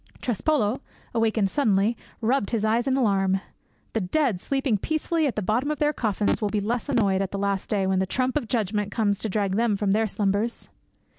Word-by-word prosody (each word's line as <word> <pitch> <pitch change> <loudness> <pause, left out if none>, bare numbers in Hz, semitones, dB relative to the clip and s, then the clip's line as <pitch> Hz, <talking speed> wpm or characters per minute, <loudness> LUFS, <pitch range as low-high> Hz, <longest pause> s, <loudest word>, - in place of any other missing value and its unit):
Trespolo, 250 0 0 0.3
awakened 220 -4 +1
suddenly, 220 -5 +2 0.3
rubbed 235 -1 +1
his 220 -3 0
eyes 230 +4 +1
in 265 0 +2
alarm. 195 -5 +2 0.5
The 225 - 0
dead, 225 - +1
sleeping 270 -6 0
peacefully 315 - 0
at 260 - -2
the 210 - -2
bottom 235 +9 0
of 300 - -1
their 300 +1 +1
coffins, 210 -4 0
will 210 - +1
be 210 - 0
less 230 +6 -2
annoyed 200 -7 +2
at 195 - -1
the 200 - -4
last 200 -1 -1
day 200 -3 +1
when 190 0 +1
the 190 - 0
trump 255 +6 0
of 295 -7 -1
Judgment 210 -3 -1
comes 205 -3 +1
to 220 - -3
drag 200 -1 0
them 225 -3 +2
from 200 -1 0
their 220 +2 +2
slumbers. 205 +3 -1
215 Hz, 205 wpm, -25 LUFS, 200-250 Hz, 0.5 s, suddenly